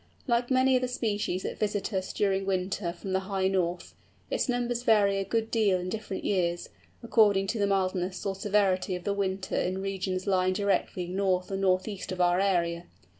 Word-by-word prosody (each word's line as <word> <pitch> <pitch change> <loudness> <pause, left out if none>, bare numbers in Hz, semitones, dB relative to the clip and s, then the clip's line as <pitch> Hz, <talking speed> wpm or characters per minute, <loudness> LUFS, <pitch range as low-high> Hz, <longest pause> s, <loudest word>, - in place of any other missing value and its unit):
Like 240 -1 +1
many 260 0 +4
other 255 0 +1
species 210 -6 -2
that - - -5
visit 205 0 -1
us 185 -1 -2
during 195 -2 +1
winter 190 -1 -1
from 190 +2 -6
the 190 - +2
high 190 0 -1
north, 180 -2 -1 0.4
its - - 0
numbers 245 -1 0
vary 205 -4 +3
a - - 0
good 225 +3 -1
deal 210 -5 +3
in 180 +1 -4
different 210 -2 -5
years, 175 -3 0 0.3
according 210 -4 +4
to 225 - -1
the 200 - +2
mildness 185 -1 -1
or 195 - 0
severity 195 -2 +1
of 180 - -7
the 200 - 0
winter 190 -1 -2
in 185 +1 0
regions 190 -1 -3
lying 185 -2 +2
directly 195 -2 0
north 185 0 0
or - - -1
north 185 0 +1
east 200 -3 -5
of 185 - -5
our 175 0 +3
area. 175 -3 +1
195 Hz, 190 wpm, -28 LUFS, 185-210 Hz, 0.4 s, many